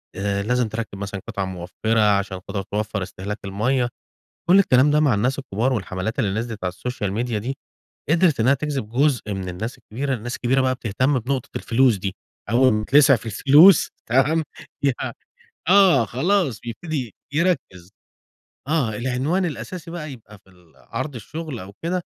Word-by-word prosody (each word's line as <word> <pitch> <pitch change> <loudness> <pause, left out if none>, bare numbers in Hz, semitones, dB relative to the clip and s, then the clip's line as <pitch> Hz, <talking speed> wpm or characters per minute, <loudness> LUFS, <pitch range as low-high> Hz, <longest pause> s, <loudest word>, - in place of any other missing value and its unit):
آآ، 100 0 -1
لازم 125 +1 +1
تركِّب 110 -2 -5
مثلًا 100 -1 -5
قطع 100 -1 -3
موفِّرة 95 +5 -2 0.2
عشان 100 -2 -3
تقدر 100 0 -3
توفَّر 105 0 -3
استهلاك 100 +3 -6
الميَّة، 120 +6 0 0.6
كل 190 +2 +7
الكلام 140 -5 +4
ده 150 - +4
مع 145 -6 +3
الناس 125 +7 0
الكبار. 125 +1 -1
والحملات 95 0 -3
اللي 100 +1 0
نزلت 115 -4 -5
على 90 - 0
السوشيال 105 0 -4
ميديا 115 0 -1
دي، 130 +6 -4 0.5
قدرت 160 -5 +3
إنّها 130 +5 +4
تجذب 140 -6 -3
جزء 125 -4 +1
من 95 -1 -5
الناس 110 +7 -5
الكبيرة، 135 +4 -3
الناس 120 +2 -5
الكبيرة 130 +2 +1
بقى 130 0 +2
بتهتم 130 +4 0
بنقطة 130 +2 -3
الفلوس 120 -2 +3
دي، 95 0 -4 0.4
أول 130 +1 +4
ما 105 0 0
تتلسع 135 0 +6
في 115 - -12
الفلوس، 145 - +6 0.2
تمام؟ 135 +7 +3 0.4
يع 135 -3 0 0.6
آه 185 - +6
خلاص 155 - 0
بيبتدي 125 - -5 0.2
يركز، 150 - -1 0.8
آه 130 -10 0
العنوان 130 - 0
الأساسي 170 +1 -5
بقى 155 -4 -6
يبقى 105 -4 -13
في 95 - -25
ال 90 -4 -23
عرض 125 - -5
الشغل 150 +3 -6
أو 95 +2 -10
كده: 180 +1 -1
120 Hz, 160 wpm, -22 LUFS, 105-140 Hz, 0.8 s, كل